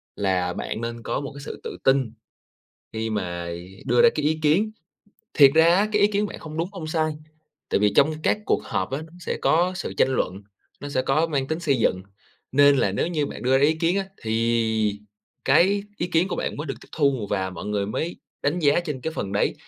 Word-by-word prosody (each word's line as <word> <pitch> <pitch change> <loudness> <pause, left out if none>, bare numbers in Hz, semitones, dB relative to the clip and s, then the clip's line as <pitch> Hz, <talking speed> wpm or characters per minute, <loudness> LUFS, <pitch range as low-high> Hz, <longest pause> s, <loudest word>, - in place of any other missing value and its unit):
là 90 -3 0
bạn 110 - -4
nên 115 0 -5
có - - -2
một 140 - -6
cái 140 - -8
sự - - -7
tự - - -6
tin 135 -4 +3 0.8
khi 110 0 -3
mà 85 -5 -3 0.4
đưa 120 0 +4
ra - - +8
cái 150 - -2
ý 155 +1 +1
kiến. 170 +9 +3 0.6
Thiệt 140 -2 +8
ra 165 +2 +6
á, 205 +2 +2
cái 210 -1 +3
ý - - +7
kiến 210 0 0
bạn - - -8
không 155 0 -8
đúng, 170 +3 -1
không 185 -6 -7
sai, 155 0 0 0.6
tại - - +1
vì 105 0 +3
trong 150 +3 +5
các - - +2
cuộc - - +2
họp 95 0 -2
á, 135 - -2
nó 160 0 -13
sẽ - - -3
có 175 +3 +3
sự 180 - -4
tranh - - +4
luận, 100 -7 -2 0.4
nó 145 - -6
sẽ 130 -2 0
có 145 +5 +2
mang 140 -5 -1
tính 160 +1 -2
xây 140 -6 +1
dựng. 95 -4 +1 0.5
Nên 145 +1 +6
là 100 -7 +1
nếu 100 - 0
như 155 -4 -1
bạn - - -8
đưa 130 +1 +3
ra 140 - +3
ý 155 +2 +4
kiến 165 +3 +1
á, 195 - 0 0.2
thì 110 -2 +1 0.5
cái 190 +9 +4
ý 175 - -2
kiến 175 +1 +1
của - - -3
bạn - - -3
mới 150 - -5
được 135 - -3
tiếp - - -16
thu 140 -8 +1
và 95 0 -1
mọi 90 - -8
người 105 -1 -1
mới 160 - -3 0.3
đánh 150 +5 0
giá 150 0 +3
trên 150 -7 -5
cái 160 +5 -3
phần 100 -10 -4
đấy, 100 - +1
140 Hz, 235 wpm, -24 LUFS, 110-165 Hz, 0.8 s, ra